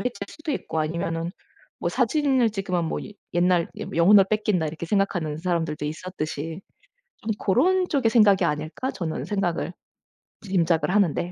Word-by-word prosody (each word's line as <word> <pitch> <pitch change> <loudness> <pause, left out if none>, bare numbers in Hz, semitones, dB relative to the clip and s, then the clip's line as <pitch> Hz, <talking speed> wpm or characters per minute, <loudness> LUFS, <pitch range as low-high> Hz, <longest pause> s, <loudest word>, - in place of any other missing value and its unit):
해칠 250 0 -2
수도 310 -1 -5
있고 160 - -3
아니면은 165 +1 -2 0.5
뭐 - - -1
사진을 270 -7 +2
찍으면 190 -4 -1
뭐 - - -3
예 210 - -10 0.2
옛날 175 -1 +3
여 - - -4
'영혼을 190 +4 +7
뺏긴다.' 210 -6 +1
이렇게 165 +2 -5
생각하는 175 -6 0
사람들도 165 -3 -1
있었듯이 160 0 -5 0.6
좀 220 - -5
'고런 360 - +2
쪽의 260 -6 +2
생각이 205 -5 +5
아닐까.' 155 - -2
저는 165 -4 -4
생각을 180 -4 -1 0.7
짐작을 175 -4 +1
하는데 180 -3 +2
180 Hz, 345 characters per minute, -25 LUFS, 165-210 Hz, 0.7 s, 영혼을